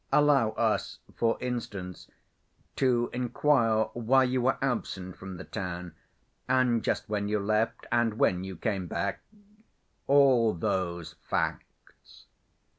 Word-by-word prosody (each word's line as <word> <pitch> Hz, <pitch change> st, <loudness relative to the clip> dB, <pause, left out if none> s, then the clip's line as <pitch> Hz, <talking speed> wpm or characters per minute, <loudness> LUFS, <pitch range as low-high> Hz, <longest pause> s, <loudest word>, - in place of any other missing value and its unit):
Allow 145 Hz, -6 st, +4 dB
us, -, -, 0 dB, 0.2 s
for 115 Hz, -1 st, +1 dB
instance, 105 Hz, -7 st, -5 dB, 0.7 s
to 120 Hz, -3 st, +1 dB
inquire 125 Hz, -3 st, +2 dB
why 125 Hz, +3 st, +3 dB
you 130 Hz, 0 st, 0 dB
were 130 Hz, +2 st, +2 dB
absent 95 Hz, -8 st, -3 dB
from 95 Hz, -1 st, -8 dB
the -, -, -7 dB
town, 90 Hz, -3 st, -5 dB, 0.6 s
and 125 Hz, -3 st, +2 dB
just -, -, -1 dB
when 100 Hz, -1 st, -2 dB
you 105 Hz, +1 st, +1 dB
left 110 Hz, +2 st, 0 dB
and 120 Hz, -2 st, +2 dB
when 90 Hz, -4 st, +2 dB
you 95 Hz, 0 st, -6 dB
came 95 Hz, 0 st, -2 dB
back—all 140 Hz, -, 0 dB
those 85 Hz, -2 st, -2 dB
facts." -, -, -5 dB
115 Hz, 115 wpm, -28 LUFS, 95-130 Hz, 0.7 s, Allow